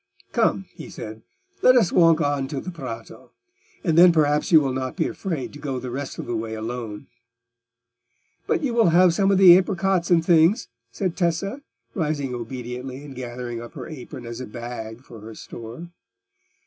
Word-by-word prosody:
"Come," - - +1
he - - -10
said, 110 +1 -8 0.4
"let 255 - +6
us 220 -8 +3
walk 165 -2 +5
on 145 -2 0
to 140 0 -4
the 185 - -6
Prato, 125 -9 -9 0.5
and 165 -4 +1
then 175 +1 +8
perhaps 150 -1 +2
you 160 - +9
will 135 -3 -1
not 130 0 -3
be - - 0
afraid 165 -5 -4
to 145 - -10
go 140 -3 -3
the 125 0 -5
rest 135 +2 -5
of - - -5
the 120 - -3
way 110 0 -4
alone." 110 0 -5 1.4
"But - - 0
you 255 -4 0
will 230 -6 +4
have 175 +1 +5
some 195 +2 +2
of 195 - +4
the 185 -2 +9
apricots 185 -1 +1
and 165 -2 +3
things," 170 +4 +4 0.2
said 170 +9 -2
Tessa, 190 - -1 0.3
rising 150 -4 -2
obediently 125 +2 -6
and 140 - -9
gathering 120 -2 -6
up 120 - -10
her - - -8
apron 130 -4 -9
as 115 +1 -6
a 130 - -6
bag 115 0 -7
for 115 -4 -12
her 110 +1 -10
store. 120 +13 -9
140 Hz, 185 wpm, -23 LUFS, 120-170 Hz, 1.4 s, you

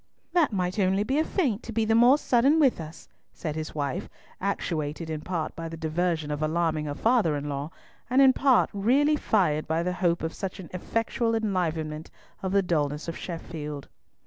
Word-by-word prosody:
"That 335 -7 +3
might 185 0 -1
only 190 +1 +2
be 265 +6 0
a - - +3
feint 265 - 0
to - - -8
be 225 0 +1
the 220 - +2
more 240 +5 +6
sudden 270 +2 +3
with 265 - +3
us," 160 0 -10 0.3
said 155 -3 -4
his 155 -1 -5
wife, 140 -3 -3 0.3
actuated 160 -5 -2
in 155 -1 -3
part 165 -2 -3
by 165 0 -5
the 165 - -7
diversion 160 -1 -1
of 145 +1 -3
alarming 155 -1 0
her 145 -1 -4
father 220 -6 +2
in 145 0 -4
law, 140 +1 -3 0.4
and 255 +2 +3
in 265 -1 +7
part 265 -2 +3
really 265 +9 +3
fired 175 - +1
by 160 +2 0
the 180 +1 -1
hope 175 -2 0
of 160 - -2
such 195 0 -5
an 180 - -10
effectual 230 +4 -1
enlivenment 165 -7 -2 0.3
of 190 - -2
the 200 0 +3
dulness 150 -3 -1
of 165 - -4
Sheffield. 150 -4 -6
175 Hz, 195 wpm, -27 LUFS, 155-225 Hz, 0.4 s, in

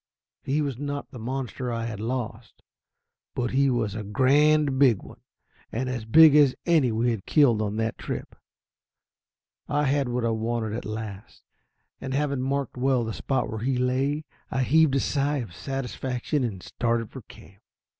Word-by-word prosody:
He 145 +3 0
was 135 -4 -3
not 145 0 -4
the 125 - -9
monster 125 +1 -4
I 115 -1 -2
had 110 -3 -5
lost, 115 -1 -5 0.7
but 125 -1 -1
he 140 +1 +3
was 115 -5 0
a 110 - -4
grand 140 +5 +3
big 125 -8 +4
one; - - -13 0.5
as 125 -1 -3
big 155 +6 +7
as 145 -3 +5
any 155 -8 +3
we 115 +2 +1
had 110 -5 -5
killed 125 -8 +4
on 105 -1 -2
that 110 0 -2
trip. - - -5 1.3
I 145 +1 +1
had 140 -2 +1
what 120 -1 -1
I 115 - +1
wanted 110 -1 -2
at 115 - -4
last, 110 -2 -7 0.6
and 130 0 -4
having 140 -2 0
marked 135 -1 -2
well 130 -1 +2
the 110 -1 -4
spot 135 +4 -1
where 110 - -5
he 125 +3 0
lay, 135 +4 0 0.2
I 130 0 0
heaved 155 +1 +4
a - - +3
sigh 145 +2 0
of 115 -10 -5
satisfaction 135 - -3
and 100 -7 -4
started 115 -2 -1
for 130 - -8
camp. 100 -2 -17
125 Hz, 170 wpm, -26 LUFS, 115-140 Hz, 1.3 s, big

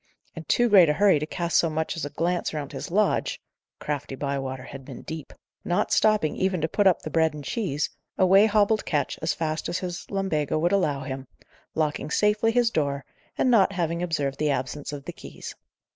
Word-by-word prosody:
In 165 - -8
too 240 - +3
great 190 -7 +7
a - - +3
hurry 195 -2 +4
to 155 - -3
cast 170 +1 0
so 165 - +3
much 160 +1 -2
as 165 - -3
a - - -4
glance 170 +2 -1
round 145 -2 -4
his - - -6
lodge 205 +4 +1 0.4
(crafty 145 -2 -4
Bywater 135 -2 -3
had 135 +1 -9
been 130 -2 -10
deep), 160 -3 -7 0.3
not 175 - 0
stopping 215 -8 +3
even 190 -1 0
to 160 - +1
put 200 +4 +2
up 185 - +3
the 155 - -5
bread 160 -1 +2
and 150 - -7
cheese, 150 - -1 0.3
away 195 +3 +6
hobbled 215 0 +2
Ketch 145 -3 -1
as 160 - 0
fast 160 -1 -2
as 175 - -1
his 180 -1 -5
lumbago 175 -8 -1
would 170 +3 +1
allow 150 -9 +1
him, 130 0 -6 0.5
locking 150 -2 -1
safely 210 +6 +2
his 240 -1 +2
door, 140 -5 -1 0.3
and 255 - +3
not 200 -4 +4
having 170 -2 -1
observed 145 -6 -2
the 150 0 +1
absence 140 +2 -3
of 145 -1 -7
the - - -6
keys. - - -9
160 Hz, 205 wpm, -25 LUFS, 145-190 Hz, 0.5 s, great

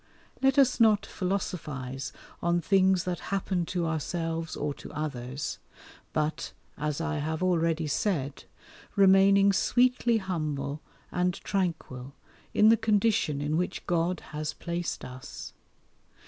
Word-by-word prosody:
Let 270 0 +3
us 260 -3 +4
not 215 -3 +5
philosophize 150 -9 -3 0.3
on 170 0 +2
things 190 0 +3
that 180 -1 -2
happen 190 -3 -1
to 175 -2 -1
ourselves 165 +1 -2
or 145 -1 -2
to - - -11
others, 140 -3 -4 0.5
but, 155 0 -2 0.2
as 150 0 -2
I 160 -1 -1
have 160 +3 -2
already 165 -3 +2
said, 145 -3 -1 0.5
remaining 195 0 +6
sweetly 245 +2 +3
humble, 150 -7 -3 0.3
and 180 0 +1
tranquil, 160 -9 -3 0.4
in 215 - +5
the 225 - +6
condition 210 -9 +2
in 150 +2 0
which 180 - -2
God 175 0 0
has 150 0 -3
placed 170 -1 -4
us. 125 +1 -9
170 Hz, 120 wpm, -28 LUFS, 150-195 Hz, 0.5 s, remaining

